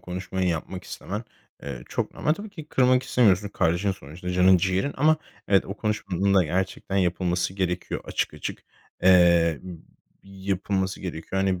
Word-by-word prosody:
konuşmayı 90 0 -3
yapmak 85 +3 -3
istemen, 105 +4 -6 0.4
eee, 65 -4 -6
çok - - -3
normal. 150 - +1
Tabii 210 +3 -9
ki 160 -6 -9
kırmak 130 -2 +3
istemiyorsun. 105 -6 +3
Kardeşin 90 +2 +1
sonuçta 90 +2 -8
canın 90 +1 +5
ciğerin 95 +9 0
ama 155 +3 +4 0.3
evet, 100 -1 +4
o 100 - -6
konuşmanın 100 -3 0
da 95 -3 +5
gerçekten 95 +3 -2
yapılması 90 0 0
gerekiyor. 90 -2 -2
Açık - - -2
açık, - - -6 0.4
eee, 85 -4 +5 0.6
yapılması 95 0 -2
gerekiyor. 95 +1 -3
Hani, 95 -2 0
95 Hz, 145 wpm, -25 LUFS, 90-100 Hz, 0.6 s, canın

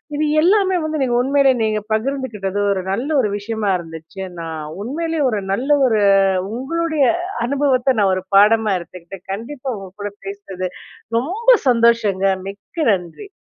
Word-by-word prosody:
இது 305 +1 0 0.2
எல்லாமே 380 +2 +3
வந்து 310 0 -2
நீங்க 250 -2 +1
உண்மையிலயே 270 0 +3
நீங்க 215 -1 0
பகிர்ந்துக்கிட்டது 220 -5 -2
ஒரு 190 -1 -1
நல்ல 240 +9 -2
ஒரு 210 - 0
விஷயமா 215 0 -3
இருந்துச்சு. 165 +3 -10 0.2
நான் 160 -2 -5 0.2
உண்மையிலே 320 +8 -3
ஒரு 215 -4 -1
நல்ல 255 +8 -2 0.2
ஒரு 225 -4 +2 0.6
உங்களுடைய 315 +4 0 0.4
அனுபவத்த 270 -1 +1
நான் 195 -2 +3
ஒரு 185 0 -4
பாடமா 215 +1 +5
எடுத்துக்கிட்டேன். 180 +1 -11
கண்டிப்பா 250 +6 -6
உங்க 195 -1 -9
கூட 205 0 -3 0.2
பேசுனது 195 -2 -5 0.5
ரொம்ப 380 - -4 0.2
சந்தோஷங்க. 230 -5 +3 0.2
மிக்க 210 - -4
நன்றி. 185 - -5
225 Hz, 140 wpm, -19 LUFS, 195-275 Hz, 0.6 s, பாடமா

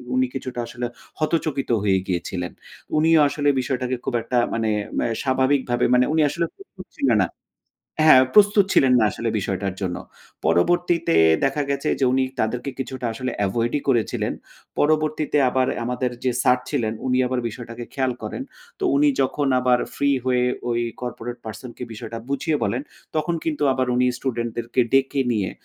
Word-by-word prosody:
উনি 130 0 +2
কিছুটা 130 -2 -5
আসলে 120 +1 -5 0.3
হতচকিত 155 -3 -1
হয়ে 95 -2 +3
গিয়েছিলেন। 90 0 -3 0.5
উনিও 160 +1 +5
আসলে 145 0 0
বিষয়টাকে 130 0 -1
খুব - - -2
একটা 125 +2 -2 0.2
মানে 110 -1 0 0.5
স্বাভাবিকভাবে 130 -1 +1
মানে 125 0 +5
উনি 160 - +3
আসলে 170 +4 -1
প্রস্তুত 200 - -13
ছিলেন 125 -5 +2
না 95 - +2 0.8
হ্যাঁ 130 -5 +8
প্রস্তুত 205 -1 +6
ছিলেন 130 -2 +5
না 110 - +4
আসলে 115 +4 -3
বিষয়টার 95 -1 -2
জন্য। 90 -3 -2 0.5
পরবর্তীতে 170 - +2 0.3
দেখা 145 +2 +1
গেছে 140 +2 -1
যে 135 - +4
উনি 130 0 +2 0.2
তাদেরকে 120 +5 -1
কিছুটা 130 -2 -4
আসলে 130 +3 -3 0.2
এভয়েড 115 +4 -1
ই - - -6
করেছিলেন। 120 -5 +1 0.5
পরবর্তীতে 155 0 +1
আবার 130 0 +1 0.2
আমাদের 125 +1 -1
যে 130 - +3
স্যার 125 +1 +4
ছিলেন 120 -7 0
উনি 125 0 +2
আবার 125 0 -1
বিষয়টাকে 115 +1 -8
খেয়াল 130 -2 0
করেন। - - -4 0.4
তো - - -3
উনি 145 +1 +4
যখন 140 +2 0
আবার 125 -1 +3 0.2
ফ্রি 140 0 +1
হয়ে 125 -1 +2 0.3
ওই 120 0 +1 0.2
কর্পোরেট 120 0 -5
পারসন 110 +3 -7
কে - - -8
বিষয়টা 110 +1 -7
বুঝিয়ে 145 +3 0
বলেন, 120 +6 -1 0.3
তখন 155 +2 0
কিন্তু 150 -2 -2
আবার 130 0 0
উনি 125 +1 +3
স্টুডেন্ট 120 -3 -2
দেরকে 120 +2 -1
ডেকে 135 +1 +2
নিয়ে 100 -5 -1
130 Hz, 160 wpm, -23 LUFS, 120-140 Hz, 0.8 s, হ্যাঁ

